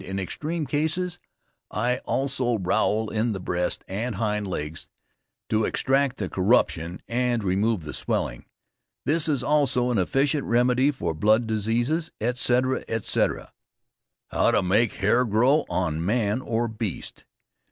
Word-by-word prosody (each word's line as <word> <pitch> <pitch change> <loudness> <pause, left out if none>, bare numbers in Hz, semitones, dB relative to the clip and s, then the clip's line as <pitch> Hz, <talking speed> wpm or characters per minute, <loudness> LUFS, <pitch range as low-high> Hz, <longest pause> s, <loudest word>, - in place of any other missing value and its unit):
In 95 +1 -5
extreme 155 - -3
cases, 160 +6 -1 0.5
I 125 +1 0
also 130 -3 0
rowel 105 +3 0
in 110 +1 0
the 95 - -4
breast 90 -1 -2
and 110 +4 -3
hind 105 0 -1
legs, 75 -3 -5 0.6
to 110 0 +2
extract 135 +3 +1
the 100 - -2
corruption 90 -4 +1
and 120 -1 0
remove 100 +1 +1
the 75 - -7
swelling. - - -2 0.6
This 160 +1 +3
is 140 -4 +1
also 140 -4 +2
an 115 - +1
efficient 135 - +1
remedy 125 +3 +3
for 90 - -2
blood 110 +8 +3
diseases, 115 +9 0
etc., 125 +2 +1
etc. 115 -2 -1 0.8
TO 105 - +2
MAKE 100 +5 +2
THE - - -13
HAIR 120 +6 +3
GROW 125 +8 +3
ON 80 -3 -1
MAN 105 +3 +1
OR 120 -1 -1
BEAST. 110 -4 -5
115 Hz, 135 wpm, -25 LUFS, 100-130 Hz, 0.8 s, This